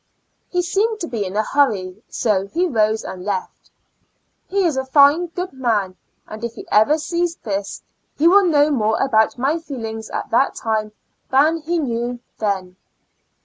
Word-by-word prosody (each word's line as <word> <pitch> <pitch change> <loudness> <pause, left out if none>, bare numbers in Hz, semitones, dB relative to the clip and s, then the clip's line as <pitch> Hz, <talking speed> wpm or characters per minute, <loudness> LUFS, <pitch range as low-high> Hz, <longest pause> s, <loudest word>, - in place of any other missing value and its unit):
He 355 0 0
seemed 425 +5 0
to 335 - -2
be 225 -7 -2
in 185 - -7
a 215 - +2
hurry, 210 -9 0
so 200 -4 0
he 345 - 0
rose 220 -6 +1
and 180 -1 -7
left. 195 -2 -4 0.8
He 395 0 +1
is 320 -5 +1
a 265 - -1
fine 280 +2 +6
and 345 0 -5
good 360 -2 -4
man, 220 -8 -1 0.3
and 215 +1 -9
if 235 -1 -4
he - - -9
ever 220 +9 +4
sees 340 +2 -1
this, 200 -6 -5 0.3
he 315 - +4
will 395 +3 +6
know 300 -3 +3
more 220 -5 +1
about 220 -5 +2
mv 290 +6 -1
feelino^s 225 -7 -6
at - - -4
that 255 +4 +2
time 215 -1 -2 0.4
than 300 +5 +4
he 330 +2 -2
then 315 - 0 0.8
knew. 180 0 -21
260 Hz, 175 wpm, -20 LUFS, 215-330 Hz, 0.8 s, fine